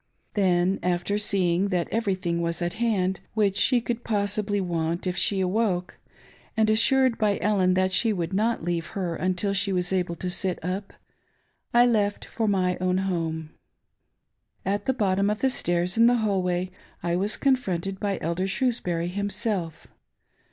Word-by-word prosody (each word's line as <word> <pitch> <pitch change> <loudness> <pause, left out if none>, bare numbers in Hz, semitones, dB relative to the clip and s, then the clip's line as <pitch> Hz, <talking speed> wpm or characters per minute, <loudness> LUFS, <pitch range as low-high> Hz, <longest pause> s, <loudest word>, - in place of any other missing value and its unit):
Then, 185 -1 +2
after 180 +3 0
seeing 190 -2 +2
that 180 -4 -1
every 215 -4 0
thing 170 -2 -2
was 170 -1 -1
at 175 -1 -2
hand 190 -5 +1 0.2
which 205 -3 +2
she 250 +4 +3
could 235 0 -4
possibly 205 -1 0
want 170 -2 -2
if 180 -1 -1
she 195 +2 +1
awoke, 185 -1 -1 0.6
and 215 -1 +3
assured 255 +2 +3
by 210 -2 +2
Ellen 190 -3 +2
that 185 0 +2
she 225 +4 +4
would 175 -3 -3
not 220 0 0
leave 170 -1 -2
her 175 -3 -2
until 185 +3 0
she 200 0 +1
was 180 0 +1
able 180 -2 0
to 180 - -5
sit 180 0 0
up, 190 +2 -4 0.8
I 240 +1 +6
left 210 -4 +1
for 225 -2 -2
my 185 -3 +1
own 185 0 +1
home. 165 -4 -2 1.1
At 200 +2 -1
the 265 - +3
bottom 200 -3 +1
of 210 +1 -2
the 265 - +3
stairs, 175 -3 0
in 230 +1 +6
the 245 - +4
hall 210 -5 +1
way, 180 0 -1 0.3
I 170 0 0
was 200 +4 0
con 275 -2 +4
fronted 190 -5 -4
by 200 -2 -1
Elder 170 +4 -1
Shrewsbury 185 -8 -1
himself. 200 -3 -3
190 Hz, 170 wpm, -25 LUFS, 180-210 Hz, 1.1 s, I